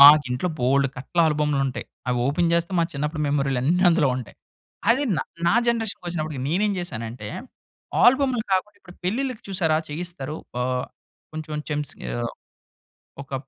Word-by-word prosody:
మాకింట్లో 145 +1 +8
బోలెడు 135 +2 +3
కట్ల 135 +6 -6
ఆల్బమ్‌లుంటాయి. 145 -3 0 0.2
అవోపెన్ 140 +8 +2
చేస్తే 170 +2 0
మా 165 - +4
చిన్నప్పుడు 150 +2 -2
మెమోరీలన్నీ 140 +4 +2
అందులో 165 -5 +4
ఉంటాయి. 125 -5 -7 0.5
అది 270 +5 +3
న - - +1 0.3
నా 205 - +4
జనరేషన్‌కొచ్చినప్పటికి 175 - -1
నేనేం 200 +5 +2
చేశానంటే, 115 -9 -5 0.8
ఆల్బమ్‌లు 260 -2 +5
కాకుండా 190 +2 0
ఇప్పుడు 175 0 -15
పెళ్ళిళ్ళకి 250 +4 -1
చూశారా 160 -5 +2
చెయ్యిస్తారు. 155 -2 -4 0.3
ఆహ్, 125 0 0 0.5
కొంచం 155 -1 -4
చెమ్స్ 150 -2 -2 0.2
ఆహ్, 120 -1 -2 0.9
ఒకప్ 135 0 -6
150 Hz, 125 wpm, -24 LUFS, 135-180 Hz, 0.9 s, మాకింట్లో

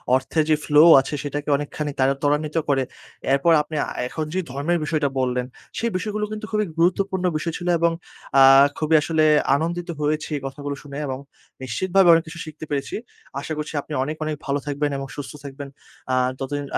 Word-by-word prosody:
অর্থের 130 +4 +1
যে, 155 - +5
ফ্লো 150 0 +6 0.2
আছে, 135 - -4
সেটাকে 145 +1 -4
অনেকখানি 145 +1 -4
তারা 135 +1 +4
ত্বরান্বিত 150 +1 0
করে। 135 -2 +3 0.5
এরপর 140 +5 +3
আপনি 150 +1 -7 0.3
এখন 155 +4 -4
যে, 185 - 0
ধর্মের 145 +6 0
বিষয়টা 150 -2 0
বললেন, 125 -1 0 0.3
সেই 235 0 -1
বিষয়গুলো 210 +2 -2
কিন্তু 215 0 -5
খুবই 215 -1 +1
গুরুত্বপূর্ণ 185 +2 +1
বিষয় 165 +1 -3
ছিল 175 - -6
এবং 170 0 +3 0.5
আ - - +10 0.3
খুবই 160 0 +2
আসলে 160 0 +1 0.3
আনন্দিত 170 +4 -2
হয়েছি 150 +1 -1
এই - - -7
কথাগুলো 140 +1 -5
শুনে 140 -1 -8
এবং 130 -1 -3 0.5
নিশ্চিতভাবে 180 - +2
অনেক 165 0 +4
কিছু 165 +2 -9
শিখতে 155 0 -9
পেরেছি। 140 -1 -2 0.4
আশা 150 +3 -4
করছি 150 +1 -5
আপনি 155 - -9
অনেক, 155 +3 -3
অনেক 155 0 -2
ভালো 140 0 0
থাকবেন 145 0 -1
এবং 135 0 -5
সুস্থ 145 - -6
থাকবেন। 140 0 -7 0.5
আ - - +3 0.2
ততদিন 145 +2 -3
150 Hz, 180 wpm, -23 LUFS, 140-170 Hz, 0.5 s, আ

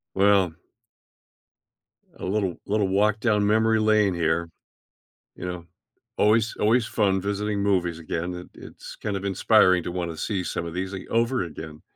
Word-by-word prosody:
Well 95 -3 +3 1.6
a - - -6
little 95 -2 -1
little 105 -1 0
walk 105 +2 +2
down 105 -3 +2
memory 110 +1 +3
lane 110 -2 +3
here. 85 0 0 0.9
You - - -6
know? 90 -1 -6 0.5
Always 110 +1 +2
always 115 +2 +2
fun 95 -3 +1
visiting 100 +1 -2
movies 90 -4 0
again, 85 +2 -4
it 90 0 -9
it's - - -11
kind 105 -2 -3
of 95 - -10
inspiring 95 -2 +4
to 85 - -5
wanna 85 -2 -4
see 95 +3 -2
some 85 - -3
of 85 - -6
these 95 +2 -4
a 95 - -7
over 115 +2 +1
again. 80 -2 -9
100 Hz, 155 wpm, -25 LUFS, 90-105 Hz, 1.6 s, inspiring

